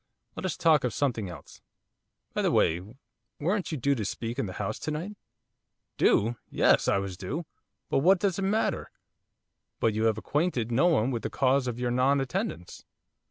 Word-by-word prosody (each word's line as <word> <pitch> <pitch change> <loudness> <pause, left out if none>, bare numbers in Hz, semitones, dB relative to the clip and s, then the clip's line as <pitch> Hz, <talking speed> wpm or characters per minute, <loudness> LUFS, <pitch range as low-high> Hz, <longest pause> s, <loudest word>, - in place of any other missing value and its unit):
Let - - -3
us 175 - -3
talk 160 -4 +4
of 125 - -1
something 115 -9 -1
else. 80 -5 -12 0.7
By - - 0
the - - +2
way, 85 +2 +2 0.6
weren't 180 +3 -1
you 155 - -2
due 140 +2 +2
to 115 -6 -2
speak 115 +5 -4
in 120 - -1
the 95 - -6
House 100 0 -3
to 155 - -4
night?' 170 +8 -4 0.8
'Due! 115 +3 +3
Yes, - - +3
I - - +3
was 100 -1 -3
due, 125 - -4 0.4
but - - +1
what 185 +7 +5
does 195 -1 0
it - - -1
matter?' 200 +3 0 0.9
'But 115 - +2
have - - -6
you 110 +1 +2
acquainted 120 - 0
no 135 +9 +4
one 135 -7 +2
with 120 -3 -2
the - - -3
cause 135 0 +2
of 120 -1 -3
your 125 -1 0
non 130 +3 +3
attendance? 125 -10 -4
130 Hz, 190 wpm, -28 LUFS, 110-155 Hz, 0.9 s, what